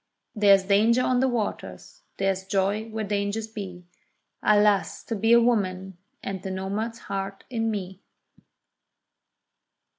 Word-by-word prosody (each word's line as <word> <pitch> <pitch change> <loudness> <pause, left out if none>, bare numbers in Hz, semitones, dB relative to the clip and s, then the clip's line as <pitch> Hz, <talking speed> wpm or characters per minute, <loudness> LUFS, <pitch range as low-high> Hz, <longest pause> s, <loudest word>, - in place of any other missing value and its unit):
There 205 -2 +6
is 195 - -1
danger 220 +5 +3
on 250 0 +2
the 265 - +3
waters—there 235 - -3
is 190 0 -6
joy 200 +2 0
where 220 -1 -4
dangers 205 +1 -2
be— 195 -5 -8 0.6
Alas! 210 -1 +3
to 230 - -4
be 225 +3 +1
a 235 - +8
woman 190 -5 0 0.3
and 190 -2 -4
the 190 - -5
nomad's 200 +5 -3
heart 195 -1 -5
in 225 -2 0
me. 190 -2 -5
205 Hz, 130 wpm, -25 LUFS, 195-225 Hz, 0.6 s, a